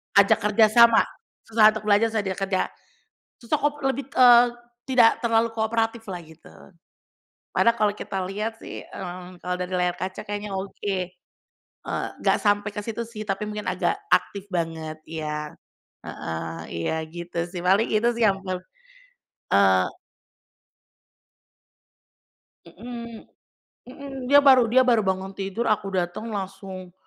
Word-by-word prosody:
Ajak 200 0 +6
kerjasama, 220 +2 +5 0.4
susah 215 -1 +5
untuk 215 -1 -6
belajar, 210 +3 +5
susah 215 - 0
dia 190 -1 -3
kerja. 195 -1 0 0.8
Susah 245 +6 -1
kop 290 0 0
lebih, 270 0 -1
eee, 245 -2 +7 0.4
tidak 245 -4 +5
terlalu 230 -1 +2
kooperatiflah 225 -3 -2
gitu. 160 +1 -16 1.0
Padahal 235 0 +3
kalau 210 -2 +2
kita 195 - -5
lihat, 215 +4 -4
sih, - - -8
eee, 180 -1 -8 0.2
kalau 180 +1 -3
dari 180 0 -5
layar 180 -1 +1
kaca 185 +1 -5
kayaknya 205 0 -5
oke. 195 0 -3 0.9
Eee, - - -3 0.2
nggak - - +3
sampai 205 0 +1
ke 205 - -5
situ, 225 +2 -4
sih, 225 -2 -9
tapi 195 +1 -2
mungkin 210 0 -5
agak 405 - 0
aktif 200 - +1
banget 165 -4 -3
iya, 150 -1 -5 0.5
heeh, 80 0 -5 0.2
iya 85 - -2
gitu, 170 +1 -5
sih, 175 0 -7
paling 195 +5 +3
itu, 215 +2 +1
sih, 235 - 0
yang 195 -1 0
ber 185 -1 -3 1.0
eee 95 -2 +5 2.8
Mhm 235 +5 -9 0.6
mhm, 275 +2 -9 0.2
dia 285 - +8
baru 260 -2 +7
dia 255 +3 +5
baru 240 -3 +4
bangun 190 0 -2
tidur, 195 +4 -3
aku 210 -3 +1
datang 175 +6 -3
langsung, 190 -2 -6
205 Hz, 135 wpm, -24 LUFS, 180-230 Hz, 2.8 s, dia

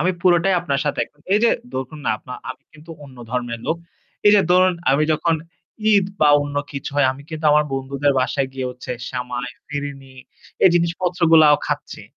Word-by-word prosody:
আমি 185 - +2
পুরোটাই 180 +1 +3
আপনার 140 -5 -1
সাথে 145 - -2
একম 145 - -27 0.2
এইযে 230 +3 +4 0.2
ধরুন, 130 +4 -5
না - - +1
আপনা 125 - -11 0.2
আমি 130 +2 -10
কিন্তু 155 +2 -15
অন্য 135 -2 -14
ধর্মের 120 -2 -3
লোক। 165 - 0 0.5
এইযে 205 0 +7
ধরুন, 185 0 +4 0.2
আমি 140 +3 +3
যখন 165 +2 +1 0.6
ঈদ 200 -2 +4 0.2
বা 150 - +5
অন্য 145 0 -6 0.2
কিছু 140 -1 -5
হয়, 145 - +4
আমি 135 +2 -12
কিন্তু 155 -1 -7
আমার 150 0 +4
বন্ধুদের 135 +1 0
বাসায় 135 +1 -1
গিয়ে 130 -1 -4
হচ্ছে 125 0 -10 0.2
সেমাই, 125 0 -4 0.2
ফিরিনি 140 -2 -6 0.5
এই - - +8
জিনিসপত্রগুলাও 170 -3 +4
খাচ্ছি। - - -4
145 Hz, 175 wpm, -21 LUFS, 135-170 Hz, 0.6 s, এই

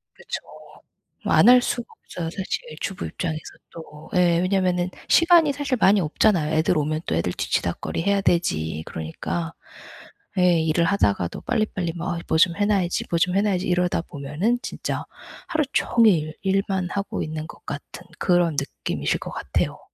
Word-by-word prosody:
그쵸. - - -5 0.9
뭐 - - +1
안 - - +7
할 250 0 +8
수가 240 -1 -2 0.2
없어요 165 -2 -5
사실. 190 +3 -3 0.2
주부 195 - -4
입장에서도 160 -3 -5
또. 155 -2 -11
예 175 -2 +4
왜냐면은 185 -1 +1 0.2
시간이 335 -3 +6
사실 280 -2 -1
많이 200 0 +5
없잖아요. 160 -1 +2
애들 160 +2 +2
오면 155 +1 -1
또 - - -1
애들 85 +2 -1
뒤치다꺼리 165 - -2
해야 200 +1 +2
되지. 80 - 0
그러니까 160 - -4 0.9
예. 180 -2 +4
일을 160 +2 +2
하다가도 100 - 0
빨리빨리 215 -8 -1
뭐 175 +1 -2
'아 - - -4
뭐 - - +2
좀 170 +1 +4
해 205 - +2
놔야지. 195 -4 +1
뭐 170 - +2
좀 180 +2 +2
해 200 - +4
놔야지.' 195 -3 0
이러다 180 -1 +1
보면은 160 - -2
진짜 - - -4 0.4
하루 315 -2 +1
종일 170 -10 +3
일만 195 -1 0
하고 200 0 -3
있는 155 0 -5
것 - - -14
같은 145 +4 -7 0.2
그런 175 -4 +2
느낌이실 140 - -2
것 - - -7
같아요. - - -2
175 Hz, 335 characters per minute, -23 LUFS, 160-200 Hz, 0.9 s, 할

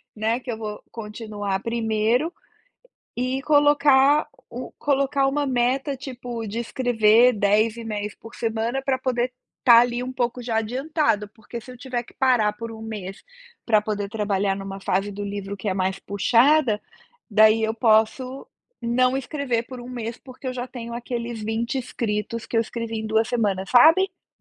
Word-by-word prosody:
né, 220 +3 0
"...que 250 -1 -6
eu 220 - -4
vou 210 -1 -6
continuar 210 -3 -4
primeiro?" 230 +6 0 0.9
e 255 +2 -1
colocar 290 -1 +4 0.2
u 245 +2 -7
colocar 275 -1 +1
uma 285 +1 0
meta, 260 +2 0
tipo, 245 -3 -6
de 215 +3 -4
escrever 235 0 +4
10 215 +2 +2
e-mails 210 -2 -4
por 225 +1 -13
semana 230 +3 -2
pra 265 -1 0
poder 250 -1 -1 0.3
estar 235 -2 +8
ali 245 0 0
um 255 +1 -5
pouco 245 0 -2
já 230 -2 -2
adiantado, 245 -2 0
porque 230 +1 -8
se 255 - -12
eu 250 - -13
tiver 245 -2 -3
que - - -17
parar 245 -6 +3
por 230 +2 -7
1 220 0 -9
mês 200 -4 -7 0.4
pra 215 -2 +4
poder 205 -2 -3
trabalhar 200 -2 0
numa 195 0 -7
fase 195 +2 0
do 205 +1 -5
livro 200 0 -5
que 200 - -9
é - - +1
mais 190 0 -1
puxada, 230 +4 +3 0.5
daí 215 +1 +5
eu 220 0 +1
posso 230 +4 +2 0.4
não 255 +2 +2
escrever 270 -3 -2
por 255 -2 -8
1 245 - -9
mês, 235 -2 -5
porque 260 0 -12
eu 255 - -1
já 250 0 -4
tenho 235 -2 -7
aqueles 235 -2 -4
20 230 +4 -2
escritos, 230 -2 -3
que - - -10
eu - - +5
escrevi 230 0 -4
em 220 - -4
2 220 +1 +2
semanas, 200 -5 -1
sabe. 325 +10 +5
230 Hz, 170 wpm, -24 LUFS, 215-255 Hz, 0.9 s, estar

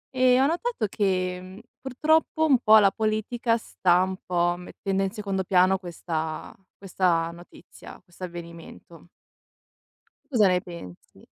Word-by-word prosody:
E 255 0 +4
ho 270 - +4
notato 345 - -1
che, 185 -3 -1
mhmm, 185 +3 -12 0.2
purtroppo 315 +4 +1
un 270 -6 +4
po' 220 -2 +6
la 200 -2 +5
politica 225 +2 -1
sta 180 -5 +1
un 190 0 -3
po' 175 -1 +1
mettendo 195 +2 -3
in 195 - 0
secondo 195 -3 -3
piano 185 +1 +3
questa 160 -3 -5 0.2
questa 175 -4 0
notizia, 175 0 -14
questo 185 0 -9
avvenimento. 170 -1 -11 1.2
Cosa 215 -5 +4
ne 180 -1 +2
pensi? 170 - -12
190 Hz, 130 wpm, -25 LUFS, 175-220 Hz, 1.2 s, po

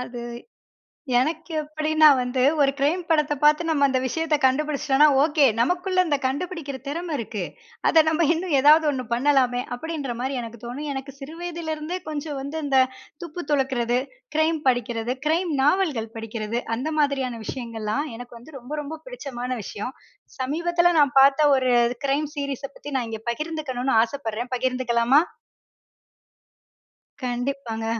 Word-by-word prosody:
அது, 245 -1 -6 1.0
எனக்கு 320 +5 -2
எப்டீன்னா, 310 +1 +3
வந்து 250 +1 -1 0.2
ஒரு 275 -1 +4
கிரைம் 315 +6 +1
படத்தை 300 -2 +2
பாத்து 300 +2 +5
நம்ம 290 -3 +3
அந்த 260 -1 +1
விஷயத்த 320 +4 0
கண்டுபிடிச்சிட்டோம்னா, 285 +1 +3 0.2
ஓகே. 300 -2 +3
நமக்குள்ள 360 +8 +1
அந்த 295 -4 +1
கண்டுபிடிக்கிற 285 0 -3
திறமை 335 +3 -3
இருக்கு. 220 -3 -4 0.5
அத 320 -1 +6
நம்ம 320 +1 +2
இன்னும் 340 -1 -3
ஏதாவது 305 +3 +6
ஒண்ணு 255 -2 -3
பண்ணலாமே, 250 -1 +2
அப்படின்ற 290 -2 -4
மாரி 265 +2 -2
எனக்கு 230 -1 -9
தோணும். 280 +5 -5
எனக்கு 270 +1 -6
சிறு 290 +3 -9
வயதிலேருந்தே 335 -1 -4
கொஞ்சம் 295 -1 -4
வந்து 280 +4 -5
இந்த 270 -2 +3 0.4
துப்பு 345 +1 -6
துலக்குறது, 255 -4 +1 0.4
க்ரைம் 315 0 +2
படிக்கிறது, 240 -1 0
க்ரைம் 330 +2 +1
நாவல்கள் 290 - +1
படிக்கிறது 225 +1 -3 0.2
அந்த 270 +7 -3
மாதிரியான 265 -5 0
விஷயங்கள்லாம் 230 +1 -3
எனக்கு 245 0 -10
வந்து 280 +6 -14
ரொம்ப, 245 +4 -13
ரொம்ப 310 +2 -7
பிடிச்சமான 260 - -6
விஷயம். 210 +7 -6 0.5
சமீபத்தில 345 +6 +1
நான் 280 -3 +3
பார்த்த 280 +2 +6
ஒரு 255 -1 +2 0.3
க்ரைம் 285 +2 0
சீரிஸை 280 -1 -3
பத்தி 290 - -9
நான் 245 -3 -2
இங்க 220 -1 -6
பகிர்ந்துக்கணும்னு 270 -4 -2
ஆசைப்படுறேன், 240 -1 -4
பகிர்ந்துக்கலாமா? 255 +1 +2 2.0
கண்டிப்பாங்க. 245 -2 -3
280 Hz, 135 wpm, -24 LUFS, 245-310 Hz, 2.0 s, அத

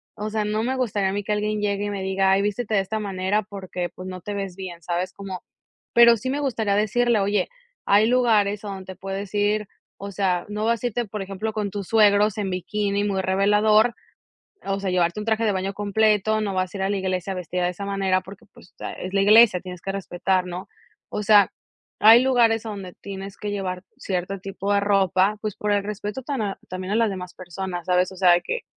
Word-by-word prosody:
o 210 +1 -4
sea, 215 0 -1
no 215 +1 -1
me 260 +3 -1
gustaría 210 -6 0
a - - -4
mí 205 0 -2
que 210 - -4
alguien 210 0 -1
llegue 205 0 -1
y - - -2
me 200 -1 -4
diga: 190 0 +2
"Ay, 195 +1 +4
vístete 210 +2 -2
de 195 - +4
esta 215 +3 -3
manera 195 0 -1
porque 185 -3 -5
pues 185 - -11
no 185 0 -6
te 205 +4 -6
ves 195 -2 -5
bien". 180 -3 -7
¿Sabes? 175 +2 -2
Cómo 195 -2 -7 0.5
pero 235 -1 +7
sí 255 +5 -4
me 285 +2 -1
gustaría 225 -7 0
decirle: 225 +2 +2
"Oye, 205 +1 +1 0.4
hay 205 +2 +5
lugares 215 -4 +2
a - - -4
donde 190 -1 -7
te - - -20
puedes 195 +1 -5
ir 210 0 +1 0.3
o 200 0 -6
sea, 180 -2 0
no 210 +1 -3
vas 230 0 0
a 245 - +2
irte, 240 +1 -2
por 210 0 -6
ejemplo, 200 +3 -4
con 210 -2 -2
tus 200 -2 -5
suegros 210 -1 +4
en 200 -2 -2
bikini 200 +2 -1
muy 195 -2 0
revelador, 210 +4 +3 0.7
o 195 0 -2
sea, 195 -1 -2
llevarte 180 +2 +1
un 210 - -5
traje 225 0 +1
de 215 - +2
baño 190 +1 -2
completo. 215 +1 +2
No 205 -2 -2
vas 185 +1 -1
a - - -3
ir - - -2
a 195 - 0
la 205 - 0
iglesia 185 0 -2
vestida 180 0 -3
de 175 - +1
esa 180 +3 -7
manera 195 -2 0
porque 195 0 -13
pues - - -18
ta - - -6
es 185 +1 -7
la 195 - +3
iglesia. 215 -2 +7
Tienes 180 -1 -9
que 195 - -3
respetar", 185 -1 -1
¿no? 180 +1 -6 0.4
O 210 - -3
sea, 205 -2 +5 0.5
hay 225 +3 +8
lugares 235 -4 +3
donde 200 -4 -6
tienes 195 0 -8
que 210 - -5
llevar 185 -2 -4
cierto 185 +1 -3
tipo 195 +1 -3
de 200 - +3
ropa. 200 0 +2
Pues 215 -3 -3
por 210 - -2
el 200 -1 +1
respeto 210 +4 -5
tan 270 -3 -3
a 200 -2 -3
también 185 +1 -5
a - - +2
las 230 -2 +2
demás 180 -2 -6
personas, 180 0 -6
¿sabes? 180 0 +2
O - - -11
sea 175 -2 +5
que 485 - -3
200 Hz, 230 wpm, -23 LUFS, 190-215 Hz, 0.7 s, hay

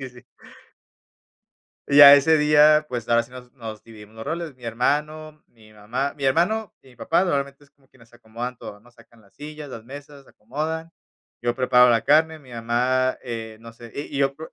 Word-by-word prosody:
sí, 130 - -7
sí, - - -20
sí. 125 0 -17 1.7
Y 140 - +1
ya 140 -1 +11
ese 155 +3 +3
día, 150 +1 +4
pues, 120 -3 -5
ahora 115 0 +2
sí 120 - -19
nos 125 -1 -12
nos 110 -5 -9
dividimos 110 -2 -15
los 110 0 -10
roles. 165 0 -5
Mi 125 - -13
hermano, 150 +6 -3
mi 110 -2 -22
mamá, 120 +7 -4
mi 140 - -4
hermano 180 +9 0
y 135 - -20
mi 125 - -20
papá 170 +3 +1
normalmente 140 -4 -3
es 140 - -24
como 135 -2 -33
quienes 115 -3 -23
se 120 - -20
acomodan 120 +2 -7
todo, 105 -2 -11
¿no?, 120 - -22
sacan 115 -1 -22
las 100 - -26
sillas, 150 0 -10
las 115 -3 -10
mesas, 140 +1 -12
se - - -21
acomodan. 155 +8 -6 0.5
Yo 120 0 -1
preparo 125 -1 +4
la 115 -1 +2
carne, 155 +2 +2
mi 130 -4 -18
mamá, 125 +2 -1
eh, 115 -2 -7
no 115 0 -12
sé, 115 +1 -14
y - - -3
y - - -2
yo 135 0 0
por 160 +1 -11
130 Hz, 215 wpm, -22 LUFS, 115-150 Hz, 1.7 s, ya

